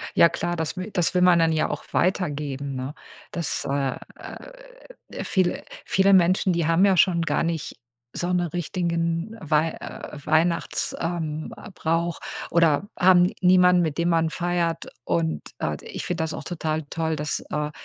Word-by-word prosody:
Ja 170 Hz, -, +7 dB
klar, 175 Hz, +1 st, -2 dB
das 160 Hz, +2 st, -3 dB
wi 185 Hz, +4 st, -5 dB
das 175 Hz, -3 st, +1 dB
will 180 Hz, -, +2 dB
man 180 Hz, -1 st, +6 dB
dann 165 Hz, -1 st, +3 dB
ja 155 Hz, -1 st, +1 dB
auch -, -, -4 dB
weitergeben, 145 Hz, -6 st, -1 dB
ne? 130 Hz, +2 st, -4 dB, 0.4 s
Dass, 170 Hz, -4 st, -2 dB
äh, 140 Hz, -1 st, 0 dB, 0.2 s
äh, -, -, -10 dB, 0.7 s
viele 185 Hz, -3 st, 0 dB, 0.2 s
viele 195 Hz, +1 st, +3 dB
Menschen, 185 Hz, +1 st, +4 dB
die 170 Hz, -1 st, 0 dB
haben 165 Hz, +4 st, +4 dB
ja 195 Hz, -1 st, +4 dB
schon 170 Hz, 0 st, +4 dB
gar 170 Hz, -, 0 dB
nicht 165 Hz, -2 st, -3 dB, 0.4 s
so 175 Hz, +1 st, -2 dB
'ne 175 Hz, -2 st, 0 dB
richtigen 170 Hz, +3 st, -2 dB
Weih 155 Hz, 0 st, +1 dB
äh, -, -, -8 dB
Weihnachts 165 Hz, +2 st, +1 dB
ähm, 160 Hz, +1 st, -3 dB
äh, 215 Hz, -, -10 dB
Brauch 165 Hz, 0 st, -1 dB, 0.3 s
oder 170 Hz, +2 st, +3 dB
haben 180 Hz, 0 st, +5 dB
niemanden, 180 Hz, -1 st, +5 dB
mit 155 Hz, -4 st, -1 dB
dem 170 Hz, +1 st, +1 dB
man 165 Hz, -1 st, +2 dB
feiert. 170 Hz, -1 st, -1 dB, 0.2 s
Und, 80 Hz, -5 st, -1 dB, 0.2 s
äh, -, -, -2 dB
d -, -, -16 dB
ich -, -, -6 dB
finde 175 Hz, -2 st, -1 dB
das 160 Hz, -1 st, -3 dB
auch -, -, -6 dB
total 160 Hz, -2 st, -3 dB
toll, 160 Hz, -1 st, -1 dB
dass, 150 Hz, 0 st, -2 dB
äh 150 Hz, 0 st, -2 dB
170 Hz, 170 wpm, -24 LUFS, 155-180 Hz, 0.7 s, Ja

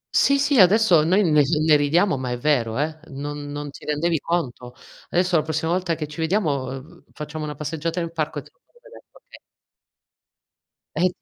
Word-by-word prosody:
Sì, 280 Hz, 0 st, +4 dB
sì 285 Hz, -3 st, +2 dB
adesso 185 Hz, -4 st, +5 dB
noi 190 Hz, +6 st, +3 dB
ne 150 Hz, -3 st, +4 dB, 0.2 s
ne 155 Hz, -, +6 dB
ridiamo 150 Hz, +3 st, +2 dB
ma 130 Hz, -1 st, -4 dB
è 125 Hz, -, -2 dB
vero, 120 Hz, -5 st, 0 dB
eh, 155 Hz, +2 st, -2 dB
non 145 Hz, +1 st, -6 dB
non 145 Hz, 0 st, -6 dB
ti -, -, -14 dB
rendevi 155 Hz, +2 st, 0 dB
conto. 125 Hz, -8 st, -3 dB, 0.3 s
Adesso 180 Hz, -1 st, +2 dB
la -, -, +3 dB
prossima 160 Hz, +1 st, -2 dB
volta 180 Hz, -2 st, 0 dB
che 155 Hz, -, -4 dB
ci 150 Hz, +2 st, -11 dB
vediamo, 160 Hz, -6 st, 0 dB
uhm, 135 Hz, +7 st, -9 dB
facciamo 150 Hz, 0 st, -6 dB
una 150 Hz, -, -6 dB
passeggiata 160 Hz, +3 st, -3 dB
nel 170 Hz, -1 st, -3 dB
parco 155 Hz, -2 st, -3 dB
te -, -, -20 dB
lo -, -, -43 dB
faccio 480 Hz, -, -29 dB
vedere, -, -, -15 dB
okay. -, -, -17 dB, 1.6 s
Eh, 180 Hz, +1 st, +2 dB
155 Hz, 185 wpm, -22 LUFS, 145-175 Hz, 1.6 s, ne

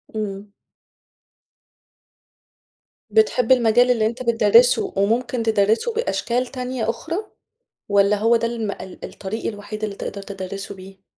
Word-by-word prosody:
امم. 200 Hz, -1 st, -5 dB, 2.6 s
بتحب 225 Hz, +3 st, +2 dB
المجال 245 Hz, 0 st, +5 dB
اللي 225 Hz, -3 st, +2 dB
أنت 235 Hz, +3 st, -2 dB
بتدَرِّسه 235 Hz, +1 st, +4 dB
وممكن 230 Hz, +4 st, 0 dB
تدَرِّسه 220 Hz, -, +2 dB
بأشكال 255 Hz, -, -1 dB
تانية 250 Hz, -3 st, -3 dB
أخرى، 320 Hz, +9 st, -3 dB, 0.7 s
والَّا 200 Hz, +1 st, +4 dB
هوّ 225 Hz, +3 st, +3 dB
ده 230 Hz, 0 st, +1 dB
الم 225 Hz, -3 st, -3 dB
ال 190 Hz, -, -9 dB
الطريق 210 Hz, +4 st, -6 dB
الوحيد 215 Hz, 0 st, -5 dB
اللي 205 Hz, -2 st, -3 dB
تقدر 200 Hz, -, -6 dB
تدَرِّسه 195 Hz, 0 st, -7 dB
بيه؟ 190 Hz, +1 st, -14 dB
220 Hz, 120 wpm, -22 LUFS, 200-240 Hz, 2.6 s, المجال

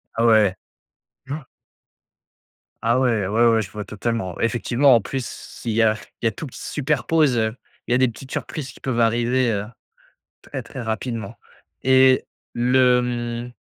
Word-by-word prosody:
Ah 115 Hz, -, +2 dB
ouais. 110 Hz, -4 st, +5 dB, 0.7 s
Je 140 Hz, -, -5 dB
vois. 150 Hz, -4 st, -7 dB, 1.3 s
Ah 115 Hz, +3 st, +2 dB
ouais. 115 Hz, -7 st, +1 dB
Ouais, 115 Hz, +4 st, +3 dB
ouais, 115 Hz, -1 st, +4 dB
je 100 Hz, -, -7 dB
vois 105 Hz, -1 st, -6 dB
totalement! 105 Hz, -4 st, -3 dB
Effectivement, 120 Hz, +3 st, +3 dB
en 115 Hz, -, +3 dB
plus 130 Hz, +4 st, -4 dB
si 115 Hz, +2 st, -7 dB
il -, -, -2 dB
y 115 Hz, -, +3 dB
a 110 Hz, -1 st, +4 dB, 0.3 s
il -, -, -3 dB
y -, -, +6 dB
a -, -, +1 dB
tout 155 Hz, -, -7 dB
qui 125 Hz, -, -11 dB
se -, -, -6 dB
superpose, 150 Hz, -1 st, +2 dB
heu, 110 Hz, +1 st, 0 dB, 0.3 s
il -, -, -4 dB
y -, -, +5 dB
a -, -, +4 dB
des 130 Hz, 0 st, +4 dB
petites 130 Hz, +3 st, -9 dB
surprises 140 Hz, -7 st, -5 dB
qui -, -, -17 dB
peuvent 125 Hz, -3 st, -2 dB
arriver, 120 Hz, +2 st, +2 dB
heu, 100 Hz, -1 st, -2 dB, 0.8 s
très, -, -, -6 dB
très 130 Hz, -, -8 dB
rapidement 110 Hz, -1 st, -4 dB, 0.5 s
et 130 Hz, 0 st, +5 dB, 0.3 s
le 125 Hz, +1 st, +4 dB
mmh 120 Hz, 0 st, -4 dB
120 Hz, 185 wpm, -22 LUFS, 115-130 Hz, 1.3 s, y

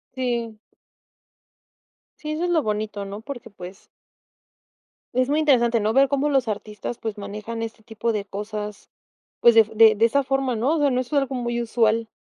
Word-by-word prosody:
Sí. 235 Hz, -4 st, -2 dB, 1.6 s
Sí, 305 Hz, 0 st, -5 dB
eso 315 Hz, +3 st, -2 dB
es 355 Hz, -, -1 dB
lo 325 Hz, -4 st, +2 dB
bonito, 210 Hz, -1 st, -3 dB
¿no? 200 Hz, +2 st, -7 dB
Porque 240 Hz, -2 st, -8 dB
pues 185 Hz, 0 st, -11 dB, 1.3 s
es 255 Hz, +2 st, +1 dB
muy 300 Hz, -, +2 dB
interesante, 240 Hz, -6 st, +3 dB
¿no?, 215 Hz, +1 st, 0 dB
ver 270 Hz, +1 st, +4 dB
cómo 280 Hz, +1 st, +1 dB
los 265 Hz, -4 st, +1 dB
artistas, 210 Hz, +2 st, -5 dB
pues, 220 Hz, -2 st, -5 dB
manejan 210 Hz, +3 st, -6 dB
este 225 Hz, -1 st, -7 dB
tipo 230 Hz, +1 st, -2 dB
de 205 Hz, -2 st, -3 dB
cosas, 210 Hz, +1 st, -6 dB, 0.5 s
pues, 235 Hz, -1 st, +6 dB
de 225 Hz, -, +8 dB
f 220 Hz, +1 st, -12 dB
de 220 Hz, 0 st, +7 dB
de 220 Hz, +2 st, +2 dB
esa 280 Hz, +4 st, +1 dB
forma, 270 Hz, -1 st, 0 dB
¿no? 270 Hz, +9 st, +1 dB
O -, -, -1 dB
sea, 290 Hz, -1 st, +3 dB
no 250 Hz, 0 st, +1 dB
es 255 Hz, +4 st, -7 dB
algo 275 Hz, -2 st, +1 dB
muy 240 Hz, -1 st, -2 dB
usual. 225 Hz, -1 st, +1 dB
230 Hz, 185 wpm, -23 LUFS, 215-265 Hz, 1.6 s, de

